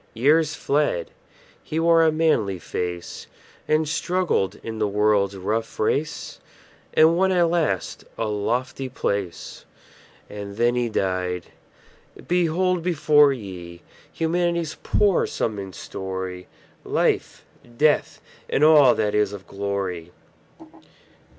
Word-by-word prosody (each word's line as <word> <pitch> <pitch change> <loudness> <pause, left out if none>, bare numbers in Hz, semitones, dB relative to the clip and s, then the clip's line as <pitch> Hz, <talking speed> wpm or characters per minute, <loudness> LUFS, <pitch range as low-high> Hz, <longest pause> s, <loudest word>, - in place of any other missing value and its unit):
Years 150 +6 +3
fled; 140 - 0 0.5
he 155 - -3
wore 165 0 +5
a 160 - +4
manly 155 - +1
face, 90 0 -5 0.4
And 155 0 +2
struggled 170 - -1
in 110 -1 -6
the 105 - +1
world's 100 -1 +2
rough 110 +4 -3
race, 145 +8 -2 0.6
And 160 +1 +6
won 190 +2 +2
at 175 -2 +3
last 170 -3 -1
a 115 - -1
lofty 120 +5 -2
place. 100 -8 -4 0.6
And 100 -1 -8
then 120 +1 +3
he 120 -1 0
died! 90 -3 -2 0.8
Behold 180 +1 +1
before 150 -4 +4
ye 90 -8 -8 0.3
Humanity's 170 -1 -1
poor 200 -3 +2
sum 110 -3 -2
and 95 -2 -8
story; 95 -1 -6 0.4
Life, - - -1 0.3
Death, 150 +1 +2 0.3
and 145 - +1
all 150 -4 +7
that 105 -1 0
is 105 -1 +1
of 95 -2 -9
glory. 95 -3 -4
115 Hz, 115 wpm, -23 LUFS, 100-160 Hz, 0.8 s, all